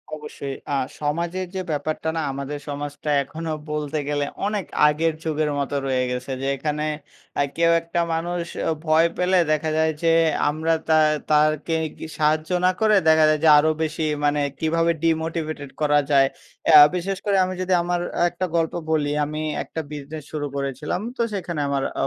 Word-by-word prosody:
অবশ্যই। 145 -2 -7 0.2
আ - - +2 0.2
সমাজের 170 +5 -2
যে 190 - -1
ব্যাপারটা 155 +2 -2
না - - 0
আমাদের 140 +2 -5
সমাজটা 145 +1 -5
এখনো 160 +3 -6 0.2
বলতে 150 0 -2
গেলে 145 -1 0 0.2
অনেক 205 -3 -2 0.2
আগের 160 +2 +1
যুগের 155 -1 0
মতো 140 0 -2
রয়ে 130 -1 +1
গেছে। 125 +2 -4
যে 135 - -2
এখানে 150 +2 -2 0.5
আ - - +4 0.2
কেউ 170 0 +4
একটা 170 +1 -2
মানুষ 175 +1 -2 0.4
ভয় 160 +1 +4
পেলে 180 +1 +2
দেখা 155 +1 +1
যায় 160 0 +3
যে 165 - +4 0.4
আমরা 160 +2 0 0.2
তা 160 - +5 0.3
তাকে 155 +1 +2 0.4
সাহায্য 155 +1 +1 0.2
না 185 - +5
করে 215 -1 +4
দেখা 160 0 +6
যায় 155 0 +2
যে 160 - +6
আরো 155 +2 +3
বেশি 160 0 -2 0.2
মানে 145 0 +2 0.2
কীভাবে 165 +1 +2
ডিমোটিভেটেড 160 -3 -1
করা 145 -1 +4
যায়? 135 -1 +5 0.5
আ - - +12 0.2
বিশেষ 185 +2 -2
করে 200 -2 +2
আমি 185 - -4
যদি 185 0 0
আমার 175 0 -1 0.3
একটা 175 +2 -3
গল্প 165 -1 +1 0.2
বলি। 150 -2 +1
আমি 155 +1 -4 0.2
একটা 160 - -5
বিজনেস 150 +1 -7
শুরু 150 -2 -3
করেছিলাম। 140 +5 -3 0.2
তো - - 0
সেখানে 175 -5 -3
আমার 140 -1 0 0.2
আ - - +1
155 Hz, 170 wpm, -23 LUFS, 145-165 Hz, 0.5 s, আ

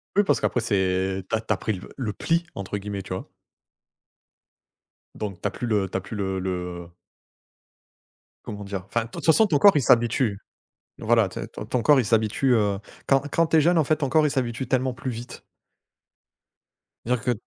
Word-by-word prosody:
Oui 205 - +5
parce 190 - +2
qu'après - - 0
c'est 95 -3 0
tu - - 0
as 110 - -1
tu 110 - -5
as - - -3
pris 110 +3 -2
le 90 - -9
le 115 -6 -3
pli 165 - 0
entre 100 +1 -4
guillemets, 100 -1 -5
tu 95 - -6
vois? 95 - -6 1.9
Donc 100 -4 -6
tu - - 0
as - - -3
plus 120 - -5
le 105 -4 +1
tu - - -2
as 95 - -4
plus 110 - -8
le 95 -2 -2
le 90 -2 -4 1.6
comment 105 -1 -7
dire? 100 -2 -5
Enfin, 115 +2 -1
toute 155 +5 -8
façon 190 +7 +5
ton 155 -7 +2
corps 200 +7 +7
il 145 - +3
s'habitue. 115 -2 +2 0.6
Voilà, 115 -2 +3
tu - - -7
sais, - - -6
ton - - -8
ton 125 - -1
corps 145 0 +5
il - - -1
s'habitue, 115 +4 +2
heu, 105 -3 +1 0.3
quand 135 -1 +3
quand 165 -1 +2
tu 160 - +3
es - - +6
jeune 170 +3 +3
en 160 - +3
fait 155 - +2
ton 145 -3 -2
corps 155 +2 +4
il - - 0
s'habitue 125 -1 -2
tellement 130 -1 +1
plus 130 - -5
vite. 120 +1 -8 1.6
Dire 125 +2 +1
que 125 +3 0
115 Hz, 205 wpm, -24 LUFS, 100-135 Hz, 1.9 s, corps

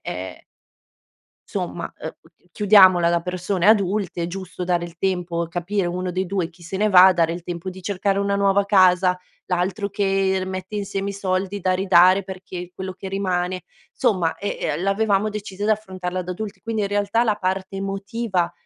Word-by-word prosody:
e" 90 +1 -6 1.1
"insomma, - - -4
ehm, - - -5
u - - -22 0.2
chiudiamola 190 -4 +6
da 170 0 +1
persone 180 +1 -2
adulte, 200 -3 +2
è - - -1
giusto 185 0 -6
dare 175 -1 0
il 170 -1 -11
tempo, 175 -3 -1
capire 175 +3 -2
uno 180 +1 -3
dei 185 +1 -1
2 180 -2 -2
chi 175 0 -20
se 175 +3 -5
ne 210 +2 +1
va, 185 0 +9
dare 165 -2 +2
il 170 0 -6
tempo 175 +1 -5
di 185 +1 -10
cercare 195 +1 -1
una 200 0 0
nuova 200 0 +2
casa, 185 -2 +4 0.3
l'altro 185 +3 -1
che 195 -1 0
mette 185 +2 -5
insieme 200 -1 -3
i 200 - -3
soldi 195 0 -2
da 185 0 +1
ridare 185 0 +5
perché 185 -1 -8
quello 190 0 -5
che 190 +1 -8
rimane" 185 -2 -2 0.4
insomma, 185 -10 +1
ehm 205 - -4 0.2
ehm, - - -4
l'avevamo 200 +1 +1
decisa 205 -1 -6
di 215 - +2
affrontarla 185 -4 -2
da 180 0 -4
adulti. 205 +2 -7
Quindi, 225 -2 -2
in 200 - -1
realtà, 205 +3 +1
la 215 -3 +1
parte 190 0 -3
emotiva 195 -2 -2
190 Hz, 180 wpm, -22 LUFS, 180-200 Hz, 1.1 s, va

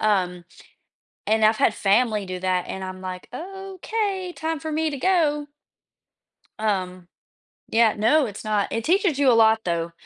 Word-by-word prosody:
Um, 180 -4 0 0.8
and 220 +1 +2
I've 215 +1 +5
had 215 - +2
family 210 0 +2
do 185 0 -5
that, 185 -1 0
and 190 0 -5
I'm 185 0 -7
like, 185 -1 -7
"Okay, 385 - -4
time 320 0 -2
for 315 - -5
me 315 0 0
to 285 - -4
go." 295 -4 +1 1.1
Um, 185 -4 -2 0.6
yeah, 225 -1 +3
no, 270 +8 +3
it's 205 - -8
not 210 -2 0
it 230 - -2
teaches 360 -4 +2
you 275 -2 +4
a - - +5
lot, 220 -1 +5
though. 170 -1 -1
220 Hz, 160 wpm, -23 LUFS, 190-315 Hz, 1.1 s, I've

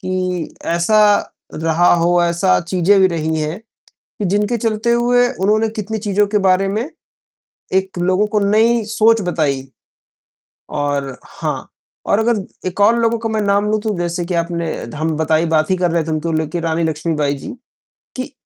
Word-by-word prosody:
कि 185 -3 -3
ऐसा 170 +6 +2 0.5
रहा 165 +2 +2
हो, 175 +1 +2
ऐसा 170 - +2
चीज़ें 185 +3 +2
भी 190 - +6
रही 160 -2 -1
हैं, 155 +5 -3 0.4
कि 210 - -9
जिनके 205 +5 +1
चलते 225 +1 0
हुए 245 +1 +3
उन्होंने 215 +3 +2
कितनी 220 0 -4
चीज़ों 205 -1 +1
के 210 +1 0
बारे 185 +1 +3
में 220 +7 -2 0.8
एक 190 -1 0
लोगों 185 +4 +2
को 210 - +3
नई 220 +3 +3
सोच 220 +1 +3
बताई 140 -6 -1 1.0
और 140 -3 -2
हाँ, - - -5 0.4
और 205 - +2
अगर 225 -4 0 0.2
एक 185 - -5
और 225 +3 +5
लोगों 230 0 +1
का 225 -1 -3
मैं 220 -1 -1
नाम 200 0 +1
लूँ 215 - +1
तो 210 -4 -2
जैसे 175 0 -2
कि 180 - -4
आपने 170 0 -2 0.2
धम 155 +7 -3
बताई 160 +1 +1
बात 155 0 +1
ही 185 - +3
कर 175 -1 +1
रहे 165 -1 +1
थे 160 - -4
उनको 155 +2 -2
लेकर 160 +2 -2
रानी 165 0 0
लक्ष्मीबाई 155 -2 -1
जी - - -9 0.7
कि 255 0 -5
185 Hz, 170 wpm, -18 LUFS, 165-215 Hz, 1.0 s, भी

